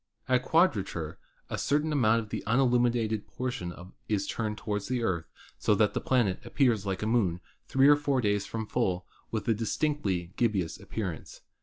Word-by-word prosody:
At 130 0 +3
quadrature 100 - +1 0.3
a - - -4
certain 150 +3 +1
amount 115 -5 +3
of 110 - -10
the - - -4
unilluminated 120 -3 +2
portion 125 -8 -4 0.4
is 100 -2 +1
turned 105 0 -3
toward 105 -1 -2
the 125 0 -1
Earth 85 -7 0 0.3
so - - +3
that - - +3
the - - -1
planet 115 -8 +1
appears 115 -8 +1
like 95 +1 -2
a - - 0
Moon 105 -7 +1 0.3
three 135 +1 +4
or 145 - +8
four 145 -2 0
days 105 -3 +1
from 110 0 -4
full, 95 -6 -1 0.2
with 110 -2 -3
a 115 - +4
distinctly 105 - -1
gibbous 100 -8 0
appearance. 95 -8 -5
110 Hz, 170 wpm, -29 LUFS, 100-125 Hz, 0.4 s, or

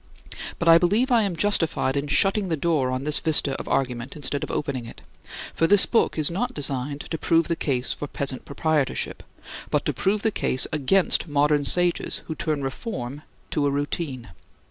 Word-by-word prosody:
But 170 - -3
I 165 0 +8
believe 210 +10 +1
I 235 -2 +4
am 195 -4 -1
justified 165 -7 +1
in 140 +1 -2
shutting 195 +5 +2
the 160 - -1
door 150 -4 0
on 130 +1 -3
this 150 +1 +2
vista 155 -3 +2
of - - -7
argument, 125 0 -2
instead 145 -1 -3
of - - -5
opening 130 -5 -3
it. - - -12 0.5
For 165 - +1
this 205 +1 +7
book 230 - +1
is 155 +1 +2
not 245 +8 -3
designed 140 0 -1
to 160 - -5
prove 165 -1 +2
the 170 - -1
case 130 -5 -1
for 145 - -6
Peasant 135 -2 -1
Proprietorship, 150 -1 -2 0.5
but - - 0
to - - 0
prove 205 +2 -1
the 220 - +2
case 130 - +2
against 165 +6 +2
modern 145 0 +2
sages 175 +3 +3
who 160 - -5
turn 155 -3 -3
reform 135 - -5 0.3
to 145 -2 0
a - - +2
routine. 140 - -3
150 Hz, 190 wpm, -24 LUFS, 140-170 Hz, 0.5 s, I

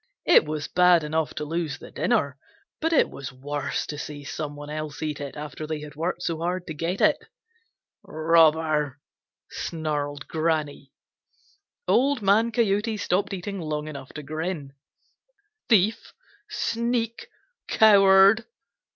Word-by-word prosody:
It - - +6
was 150 -1 -4
bad 180 -2 +4
enough 155 +1 -2
to 150 - -4
lose 160 -3 -3
the - - -12
dinner, 140 - 0 0.4
but 325 +1 0
it 325 - +3
was 140 +1 -7
worse 140 +2 -3
to 150 - -6
see 145 -1 -7
some 145 +1 -5
one 145 0 -8
else 155 -1 -5
eat 150 -1 -3
it 140 +1 -7
after 150 +1 -6
they 155 -1 -4
had 150 -1 -9
worked 165 +4 -3
so 165 -2 -2
hard 180 +2 -2
to 160 - -6
get 165 +5 -3
it. - - +4 0.8
"Robber!" 155 -3 +2 0.5
snarled 145 -3 -3
Granny. 155 -4 -2 1.0
Old 270 -2 +2
Man 215 +4 +3
Coyote 220 -1 +1
stopped 200 0 0
eating 195 +1 -5
long 150 -1 -3
enough 140 -3 -8
to 150 - -7
grin. 155 -1 -4 1.0
"Thief! 215 -1 +2 0.4
Sneak! 230 0 -2 0.4
Coward!" 200 +1 +6
160 Hz, 135 wpm, -25 LUFS, 150-195 Hz, 1.0 s, It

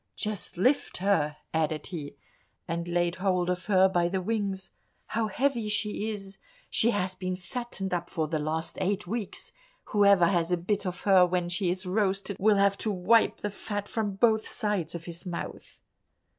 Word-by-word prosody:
"Just 210 -4 -3
lift 255 +10 +2
her," 165 -6 +1 0.2
added 155 -1 0
he, 155 -6 -6 0.5
and 170 +1 -3
laid 175 0 0
hold 185 -2 +1
of 180 0 -4
her 190 -2 +6
by 175 -2 +1
the 190 +1 -1
wings; 195 -1 -2 0.4
"how 220 0 0
heavy 235 0 0
she 210 0 0
is—she 195 +2 -2
has 190 -4 0
been 185 0 -3
fattened 195 +1 -5
up 175 0 -2
for 160 -3 -1
the 155 0 -1
last 155 +2 -2
eight 200 +2 0
weeks. 210 +2 -4 0.4
Whoever 200 -3 +6
has 170 -1 +1
a 180 - +3
bit 195 +3 -1
of 180 -1 -4
her 190 -2 +6
when 180 -1 +1
she 180 +1 0
is 185 +2 -2
roasted 195 0 0
will 210 +1 +4
have 200 0 +3
to 220 - -1
wipe 205 +4 +3
the 205 - -2
fat 205 0 -4
from 210 -3 -2
both 220 +1 +3
sides 205 -8 -1
of 165 -1 -6
his 170 0 -7
mouth." 175 - -6
190 Hz, 175 wpm, -28 LUFS, 175-210 Hz, 0.5 s, her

